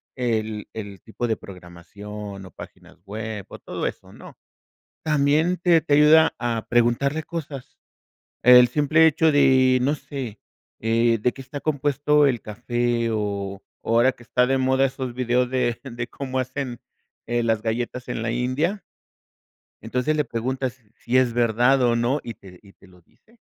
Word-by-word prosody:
el 110 -4 -2
el 100 -3 -8
tipo 120 +2 -4
de 110 - 0
programación, 100 +2 -10
o 95 - -13
páginas - - -13
web, 105 0 -6
o - - -9
todo - - -4
eso, - - -8
no, - - -13 0.7
también 155 +4 +2
te 170 -2 +3
te 150 -1 -1
ayuda 155 +2 +6
a 115 -2 -2
preguntarle 120 +6 +1
cosas. 145 -6 -7 0.7
El 125 0 +8
simple 150 +5 +3
hecho 160 0 +3
de, 130 -2 +4
no 140 +3 +2
sé, 135 -7 -7 0.4
eh, 115 +1 +2
¿de 125 - +1
qué - - -12
está 135 +2 -8
compuesto 145 0 +2
el 125 -4 +1
café?, 120 +2 -1
o, 100 -2 -3 0.2
ahora 120 +3 +3
que 120 - -18
están 125 +3 +1
de 135 - +2
moda 130 +1 +2
esos 130 -1 -5
videos 125 0 0
de 125 -2 0
de 120 -3 -6
cómo 130 -2 -5
hacen, 130 -1 -4 0.5
eh, 120 0 0
las 115 -2 +1
galletas 120 +2 -3
en 115 - -3
la 115 - -1
India. 130 - -1 1.0
Entonces 125 +7 -1
le 150 - +1
preguntas, 130 +2 -3
si 120 +1 -2
es 125 -2 +2
verdad 120 +3 +3
o 120 -1 +3
no, 125 +5 0
y 115 - -7
te 95 -4 -15
y 100 -1 -18
te - - -21
lo 90 -1 -20
dice. 225 - -29
125 Hz, 165 wpm, -23 LUFS, 115-140 Hz, 1.0 s, El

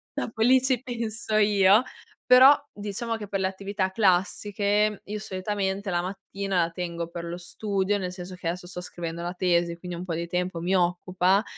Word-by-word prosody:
dopo 225 -1 -4
lì 255 +2 +6
ci 260 -2 0
penso 230 -3 -4
io. 205 0 +5 0.5
Però 260 +3 +9 0.2
diciamo 210 +3 -4
che 210 - -7
per 195 0 -2
le 190 - +2
attività 195 0 -2
classiche 205 +1 +1
io 210 +1 -5
solitamente 195 0 -3
la 175 -1 +1
mattina 195 +1 -3
la 165 - -1
tengo 170 -1 -4
per 170 0 -6
lo 170 +1 -5
studio, 200 +2 -1
nel 180 -2 -4
senso 180 0 -8
che 180 -1 -6
adesso 175 +1 -3
sto 180 0 -7
scrivendo 170 -1 -6
la 175 - -3
tesi, 175 -2 +1
quindi 175 0 -6
un 180 - -6
po' 170 - -3
di 170 +1 -3
tempo 180 -1 -2
mi 180 +3 0
occupa 180 +2 +2
190 Hz, 185 wpm, -26 LUFS, 180-210 Hz, 0.5 s, Però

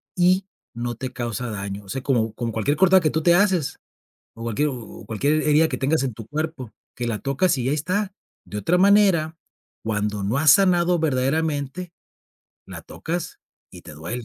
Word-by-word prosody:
y 185 +1 +3 0.3
no 120 0 -4
te 130 +2 -6
causa 120 -1 -4
daño, 100 -1 -5
o 95 - -16
sea, 135 +3 -4
como 115 -5 +1
con 115 +1 -3
cualquier 115 +7 0
cortado 190 +1 +5
que 155 - +2
tú 160 0 -1
te 175 - +5
haces, 185 -6 +2 0.6
o 115 - -8
cualquier 115 +6 0
o 120 -5 -9
cualquier 145 +8 0
herida 150 +2 +4
que - - -3
tengas 140 +2 +1
en 130 -3 -2
tu 110 0 -10
cuerpo, 155 -5 -4 0.2
que 120 - -3
la 110 -3 -2
tocas 140 - +1
y 125 0 -1
ahí 145 - +1
está. 185 +6 -2 0.3
De 105 - -7
otra 135 - +1
manera, 190 -5 +4 0.5
cuando 105 -2 -2
no 105 +7 0
has 150 0 +6
sanado 180 -2 +4
verdaderamente, 155 +3 -1 0.7
la - - -8
tocas 170 +1 -5 0.3
y - - -12
te - - -10
duele. 85 +12 -5
140 Hz, 185 wpm, -23 LUFS, 115-170 Hz, 0.7 s, has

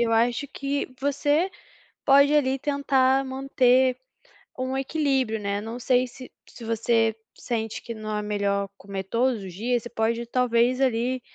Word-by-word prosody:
eu 230 -1 +2
acho 235 +4 +2
que 275 -1 -3
você 290 +5 +1 0.6
pode 280 +1 +6
ali, 270 -3 +2
tentar 270 -2 +2
manter 260 -1 +2 0.6
um 260 +1 -2
equilíbrio, 270 -5 0
né, 200 0 -2
não 225 +3 -6
sei 250 +1 +2
se 255 +1 -12 0.2
se 240 - -13
você 225 0 +1 0.2
sente 225 -3 -4
que 230 - -6
não 215 -1 -5
é 210 - -1
melhor 200 -1 -1
comer 195 -1 -6
todos 235 +2 0
os 185 -2 -8
dias, 235 +4 -1
você 240 - -7
pode 230 +1 -1
talvez, 250 +1 +2
ali, 250 0 +1
245 Hz, 155 wpm, -25 LUFS, 225-265 Hz, 0.6 s, pode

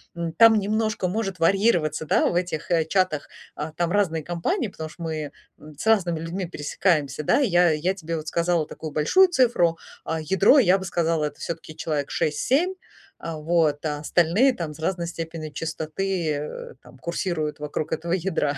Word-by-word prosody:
м. 170 -1 -3
Там 225 +6 +7
немножко 215 -1 0
может 195 -1 -2
варьироваться, 170 -3 +2
да, - - +3
в - - 0
этих, 175 -2 -2
э, 165 -2 +3
чатах, 185 -3 0 0.3
а, 150 +1 -5
там 170 +2 -1
разные 175 -6 +1
компании, 175 - -1
потому 160 -4 -7
что 170 - -10
мы, 155 -3 -4 0.3
м, 150 -1 -14
с - - -6
разными 185 -7 +2
людьми 170 +3 -4
пересекаемся, 150 -2 -1
да. - - +3
Я 180 -10 +4
я 160 +5 0
тебе 165 0 -4
вот 155 -1 -6
сказала 170 -1 +1
такую 155 0 -8
большую 260 - +5
цифру, 240 - +2 0.3
а 160 0 -2
ядро 190 - +4
я 190 -6 +5
бы 190 - -6
сказала, 165 -3 0
это 145 -1 -6
всё-таки 165 -2 -6
человек 150 -3 -2
6-7, 270 - +1 0.4
а 165 -1 -6
вот, 155 -1 +1
а 150 -1 -2
остальные 175 - +3
там 165 -8 -5
с 150 - -15
разной 170 +1 -1
степенью 165 -2 -6
частоты, 160 +3 -2
э, 150 - -5
там - - -17
курсируют 170 -3 -3
вокруг 150 +1 -4
этого 170 +2 -2
ядра, 165 -6 0
170 Hz, 180 wpm, -24 LUFS, 155-190 Hz, 0.4 s, Там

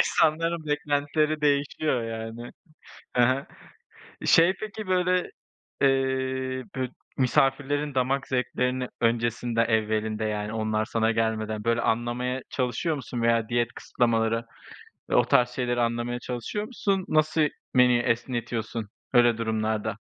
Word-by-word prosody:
insanların 165 +1 +2
beklentileri 150 +1 0
değişiyor 145 -2 +1
yani. 115 +1 -6 0.6
Ha 120 -1 +4
ha. 135 +2 -1 0.8
Şey, 170 +3 +6
peki, 215 0 -6
böyle, 180 -1 +1 0.5
eee, 130 -1 0
bü 130 -1 -1 0.3
misafirlerin 135 +3 +1
damak 135 +1 0
zevklerini 125 0 -1
öncesinde 115 0 +1
evvelinde 110 -1 0
yani 105 0 -2
onlar 110 -1 0
sana 110 0 +1
gelmeden, 110 -1 -1
böyle, 115 0 +2
anlamaya 120 +3 -1
çalışıyor 130 +5 -1
musun 125 -3 -5
veya 115 -1 +2
diyet 120 0 0
kısıtlamaları, 115 -1 0 0.7
eee, - - +3
o - - +5
tarz 125 0 +4
şeyleri 120 -1 -1
anlamaya 120 +1 -1
çalışıyor 125 - -4
musun? 200 -6 -1
Nasıl 155 +1 +2 0.3
menüyü 125 -1 +5
esnetiyorsun 115 -2 -2 0.2
öyle 120 -1 +5
durumlarda? 110 -1 -1
125 Hz, 115 wpm, -26 LUFS, 115-140 Hz, 0.8 s, Şey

